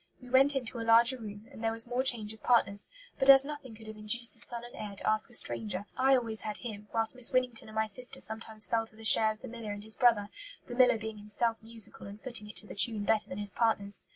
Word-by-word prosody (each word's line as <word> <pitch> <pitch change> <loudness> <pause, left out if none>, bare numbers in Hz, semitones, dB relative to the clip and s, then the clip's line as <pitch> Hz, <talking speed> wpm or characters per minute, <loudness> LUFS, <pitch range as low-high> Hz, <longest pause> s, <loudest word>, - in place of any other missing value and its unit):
We 250 -1 -14
went 275 +2 +4
into 250 -2 -3
a - - -4
larger 235 +3 +5
room, 210 -1 -10
and 225 - -12
there 225 - 0
was 230 0 0
more 245 +1 -2
change 225 -5 +1
of 220 - -17
partners; 205 -4 +2 0.3
but 270 0 +1
as 270 0 +8
nothing 290 -5 -9
could 220 0 -15
have 215 0 -10
induced 220 +3 +1
the - - -11
son 235 0 -2
and 240 - -12
heir 205 -2 -8
to - - -5
ask 215 0 +1
a - - -16
stranger, 205 -5 0
I 265 +1 +3
always 225 -3 -1
had 210 -1 -4
him, 210 -3 -9
whilst 225 -1 -1
Miss 250 -2 +4
Winnington 250 -3 -1
and 215 - -13
my 220 0 0
sister 245 +4 -1
sometimes 220 -1 -2
fell 225 +1 -1
to 215 - -12
the 225 - -14
share 220 0 +5
of 215 - -22
the - - -7
miller 230 -3 -8
and 205 0 -9
his 220 0 +2
brother, 225 -4 +2 0.4
the 245 - -8
miller 250 -2 +4
being 220 -1 -8
himself 225 +2 -1
musical 225 -3 -3
and 200 +1 -11
footing 215 -4 -3
it - - -12
to - - -2
the - - -10
tune 210 0 +3
better 215 0 +1
than 185 - -7
his 205 -1 +1
partners. 205 -3 -1
225 Hz, 265 wpm, -30 LUFS, 215-240 Hz, 0.4 s, as